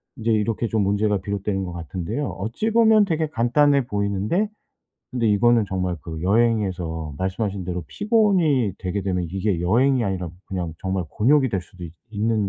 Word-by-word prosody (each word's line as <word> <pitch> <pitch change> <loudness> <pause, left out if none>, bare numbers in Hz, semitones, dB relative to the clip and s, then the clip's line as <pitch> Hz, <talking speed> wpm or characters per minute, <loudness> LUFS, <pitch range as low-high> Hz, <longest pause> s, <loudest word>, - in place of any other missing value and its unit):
인제 115 0 -1
이렇게 110 +2 0
좀 110 -2 0
문제가 100 +1 +1
비롯되는 100 0 -2
것 90 - -6
같은데요. 85 - -4
어찌 115 - -2
보면 220 -2 +5
되게 160 -3 0
간단해 140 +1 +2
보이는데 100 - 0 0.6
근데 120 -3 0
이거는 115 +2 +4
정말 90 -2 -2
그 80 -1 -6
여행에서 95 -7 0
말씀하신 95 +1 -2
대로 90 -1 -3
피곤이 185 - +2
되게 95 +2 -2
되면 90 -2 -1
이게 95 -2 -1
여행이 120 +7 +3
아니라 95 -3 -2 0.2
그냥 90 -4 -4
정말 95 -2 -2
곤욕이 130 +4 +3
될 95 -4 -2
수도 90 0 -15
있 80 - -9 0.2
있는 110 -1 0
105 Hz, 370 characters per minute, -23 LUFS, 95-120 Hz, 0.6 s, 보면